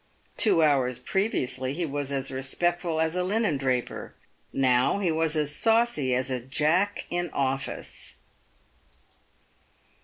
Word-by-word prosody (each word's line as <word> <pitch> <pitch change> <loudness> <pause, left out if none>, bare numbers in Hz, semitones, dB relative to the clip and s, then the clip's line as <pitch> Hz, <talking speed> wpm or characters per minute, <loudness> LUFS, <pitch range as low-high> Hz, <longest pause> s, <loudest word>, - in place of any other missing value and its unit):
Two 190 -8 +5
hours 130 -5 +2
previously 130 - -1
he 175 +1 -1
was 145 -2 -3
as 135 -1 -2
respectful 165 +5 -1
as 160 +1 +1
a 180 - 0
linen 200 -5 +1
draper; 130 -2 -2 0.4
now 130 +3 +2
he 190 -4 0
was 160 0 +1
as 150 -1 0
saucy 225 - +2
as 130 +1 -1
a 125 -1 -2
Jack 155 - +1
in 175 0 -1
office. 135 0 -3
150 Hz, 125 wpm, -27 LUFS, 130-175 Hz, 0.4 s, Two